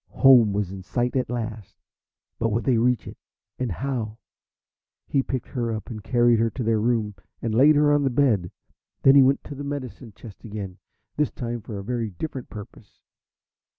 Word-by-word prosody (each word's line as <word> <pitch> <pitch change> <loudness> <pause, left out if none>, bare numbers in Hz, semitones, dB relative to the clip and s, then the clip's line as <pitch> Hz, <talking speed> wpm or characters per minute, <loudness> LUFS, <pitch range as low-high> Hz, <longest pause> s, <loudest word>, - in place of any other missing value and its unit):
Home 125 -6 +6
was 100 -2 -2
in 95 -1 -7
sight 120 +8 -2
at 130 - 0
last, 110 -4 -5 0.6
but 115 - +1
would 115 +2 -1
they 120 0 +2
reach 125 +1 +1
it - - -9 0.4
and 125 -4 -1
how? 115 -1 -3 0.9
He 140 - +1
picked 130 -2 -4
her 120 -3 -2
up 110 +2 -5
and 110 -2 -7
carried 120 0 +3
her 115 0 +2
to 125 - -5
their 110 -1 +2
room 110 -2 0 0.3
and 115 -1 -2
laid 140 +7 +6
her 145 0 +4
on 145 - +3
the 135 - +2
bed. 120 -9 +2 0.5
Then 135 - +7
he 140 - +8
went 135 +1 +3
to - - -8
the 140 +1 -7
medicine 135 -4 -6
chest 110 -5 -13
again, 100 -4 -7 0.4
this 150 -1 +2
time 120 -2 -5
for 105 0 -7
a 100 - -6
very 115 0 -2
different 130 - -6
purpose. 105 -3 -12
120 Hz, 190 wpm, -24 LUFS, 110-130 Hz, 0.9 s, he